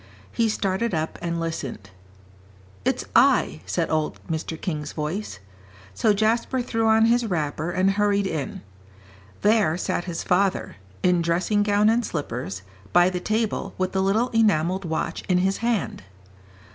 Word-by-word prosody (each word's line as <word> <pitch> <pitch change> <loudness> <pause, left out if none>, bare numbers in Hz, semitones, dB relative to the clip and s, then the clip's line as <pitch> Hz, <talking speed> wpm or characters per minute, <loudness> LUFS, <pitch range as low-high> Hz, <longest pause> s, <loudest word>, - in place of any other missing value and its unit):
He 230 -1 +1
started 200 +1 -1
up 155 0 -3
and 170 -1 -2
listened. 140 - -5 0.9
"It's - - 0
I," 75 +3 +4
said 170 -2 -1
old 155 -1 -1
Mr. 160 0 -4
King's 150 -4 -4
voice. 155 - -4 0.6
So 210 - +2
Jasper 225 +5 +1
threw 225 -2 0
on 220 0 +5
his 235 0 +2
wrapper, 155 -3 -2
and 185 +2 +2
hurried 200 0 +1
in. 155 - -4 0.8
There 210 -6 +3
sat 175 - -2
his 175 -2 -4
father, 190 - 0 0.3
in 180 -1 +3
dressing 175 +5 +1
gown 205 0 +3
and 230 +2 +3
slippers, 120 - -4 0.3
by 175 +1 +5
the 180 - -2
table, 215 +3 -1
with 185 0 -1
the 190 - 0
little 215 +6 +2
enamelled 190 -4 +2
watch 160 +1 -2
in 180 - +4
his 190 +2 +1
hand. 230 -5 -1
185 Hz, 145 wpm, -24 LUFS, 160-215 Hz, 0.9 s, on